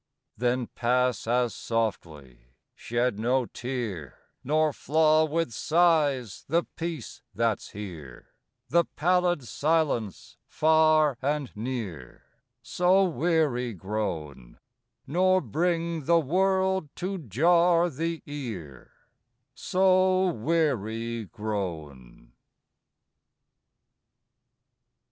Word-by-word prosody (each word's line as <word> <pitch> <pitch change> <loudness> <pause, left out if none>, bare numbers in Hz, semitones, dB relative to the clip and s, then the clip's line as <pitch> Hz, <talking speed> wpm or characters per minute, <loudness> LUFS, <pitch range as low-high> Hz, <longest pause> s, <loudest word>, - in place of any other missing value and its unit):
III - - -58
Then 125 0 0
pass 125 -2 0
as 120 -1 +1
softly: 75 - -4 0.2
shed 120 -2 -2
no 125 +3 +1
tear 115 - -5 0.3
Nor 155 +2 +1
flaw 155 +2 +3
with 160 -2 -1
sighs 150 - +1
the 170 +3 +2
peace 160 -11 -6
that's 115 -2 -1
here; 85 -11 -9 0.4
The 170 +1 +3
pallid 175 -2 +1
silence, 140 - -1
far 155 -3 +3
and 145 -2 -2
near, 105 - -6 0.4
So 185 +2 +3
weary 155 - 0
grown; 80 - -5 0.5
Nor 185 +5 +3
bring 165 - -1
the 170 +2 +4
world 190 +2 +1
to 190 +1 -4
jar 170 - +3
the 165 +1 -4
ear 110 - -8 0.6
So 185 +3 +2
weary 115 - -1
grown. 85 - -6
130 Hz, 85 wpm, -27 LUFS, 110-165 Hz, 0.6 s, the